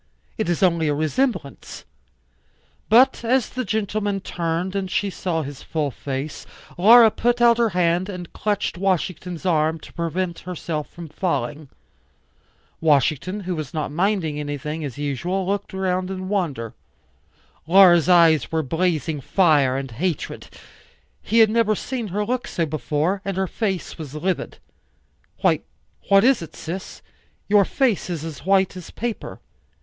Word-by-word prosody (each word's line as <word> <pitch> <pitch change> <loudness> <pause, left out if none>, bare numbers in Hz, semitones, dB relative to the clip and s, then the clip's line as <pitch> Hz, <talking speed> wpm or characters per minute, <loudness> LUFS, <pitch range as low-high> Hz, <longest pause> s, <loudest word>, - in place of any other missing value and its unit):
It 220 -5 -2
is 175 +2 0
only 170 -3 +3
a 145 - +1
resemblance. 155 - -2 1.0
But 240 +3 +5
as 245 +1 +1
the 255 - -3
gentleman 205 -1 -1
turned 175 +1 -3
and 195 -1 -2
she 200 +2 -1
saw 165 -4 -2
his 140 -1 -8
full 150 -3 -2
face, 140 +3 -5 0.3
Laura 225 +4 +7
put 240 +2 0
out 235 -1 +5
her 230 -1 +3
hand 175 +2 +2
and 180 -3 -7
clutched 205 -4 -2
Washington's 180 -2 -2
arm 160 -2 +1
to - - -13
prevent 170 +1 -2
herself 165 -4 -5
from 170 -1 -10
falling. 150 -3 -3 1.1
Washington, 155 +6 +1
who 185 -1 -3
was 155 0 -6
not 155 -2 -2
minding 170 -3 0
anything, 150 +2 -4
as 135 -5 -6
usual, 170 +7 -2
looked 200 +1 -2
'round 185 -1 -1
in 185 -1 -5
wonder. 145 - -2 0.9
Laura's 175 -2 +6
eyes 165 -3 +5
were 160 -1 0
blazing 160 0 -1
fire 145 -6 +3
and 135 -2 -5
hatred; 165 +8 -3 0.7
he 225 - -1
had 225 -2 +7
never 225 -2 +2
seen 245 +1 -4
her 205 +2 -2
look 250 +2 -2
so 165 - -1
before; 155 +5 -1
and 195 -1 -3
her 190 - +1
face, 190 -3 -3
was 150 -2 -7
livid. 180 +4 -2 0.8
"Why, - - +3 0.5
what 195 0 +6
is 260 -3 +4
it, 160 -2 -9
sis? 180 +4 -7 0.4
Your 205 -1 +5
face 245 -7 0
is 165 -3 -4
as 160 +1 -8
white 190 -1 +3
as 180 -3 -9
paper." 235 -1 -5
180 Hz, 150 wpm, -22 LUFS, 155-200 Hz, 1.1 s, Laura